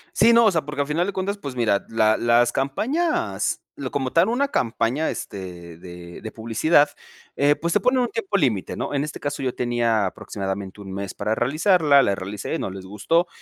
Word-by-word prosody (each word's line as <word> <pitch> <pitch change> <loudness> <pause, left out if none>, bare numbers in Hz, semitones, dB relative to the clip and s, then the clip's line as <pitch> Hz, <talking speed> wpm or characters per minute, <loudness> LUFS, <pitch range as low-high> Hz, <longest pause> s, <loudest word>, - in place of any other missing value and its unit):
Sí, 235 - +6
no, 235 0 +6
o 210 - +5
sea, 165 -3 +1
porque, 150 -1 -3
al 140 - -2
final 170 +5 0
de 200 - -3
cuentas, 200 +2 -2
pues 140 -8 -7
mira, 110 -5 +1
la 110 -1 +3
las 120 +1 +3
campañas 135 - -1 0.2
lo 130 -2 -4
como 130 -2 -2
tal, 170 +4 +4
una 275 +4 +1
campaña, 120 - 0
este, 90 -4 -7
de 85 0 -10
de 110 - -7
publicidad, 115 +7 +3 0.5
eh, 145 +1 +4
pues, 170 +1 -3
se 210 - +3
pone 250 +6 +2
en 250 - +3
un 240 - -1
tiempo 210 -3 -3
límite, 115 - 0
¿no? - - -4
En 140 0 0
este 150 - -8
caso, 145 -1 -3
yo 130 -2 -2
tenía 120 -4 +1
aproximadamente, 95 +1 -5
1, 95 -1 -8
mes 100 0 -5
para 110 - -1
realizarla, 150 - +3
la 100 - +2
realicé, 100 +1 -4
y - - -3
no - - -3
les 95 0 -8
gustó. 165 - +1
125 Hz, 215 wpm, -23 LUFS, 100-165 Hz, 0.5 s, Sí